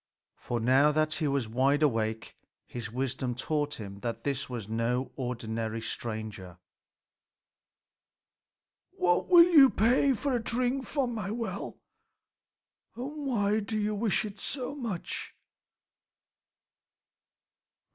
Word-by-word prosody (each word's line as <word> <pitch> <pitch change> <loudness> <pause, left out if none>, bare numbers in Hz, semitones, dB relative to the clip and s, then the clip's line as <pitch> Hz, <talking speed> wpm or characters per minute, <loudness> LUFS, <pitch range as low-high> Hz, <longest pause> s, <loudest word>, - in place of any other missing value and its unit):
For 120 - -3
now 130 +6 +4
that 155 0 +1
he 155 0 -1
was 140 -4 0
wide 135 +6 +2
awake, 110 -5 0 0.3
his 115 -3 -6
wisdom 130 0 -2
taught 145 +3 -1
him 100 -2 -8
that 115 +1 -4
this 140 -2 -2
was 120 -5 -5
no 115 +3 -1
ordinary 115 -3 -3
stranger. 110 -5 -6 2.4
"What 175 -1 +1
will 345 -2 +9
you 295 -6 +8
pay 250 +6 +3
for 265 +2 -1
a 240 - 0
drink 250 +3 0
from 265 -5 -1
my 210 -4 -4
well, 230 +2 -4 1.2
and 280 +4 -5
why 210 -4 +1
do 215 +1 -3
you 210 0 0
wish 210 0 +1
it 205 -1 -8
so 265 +3 -2
much?" 230 -11 -5
150 Hz, 115 wpm, -29 LUFS, -, 2.4 s, will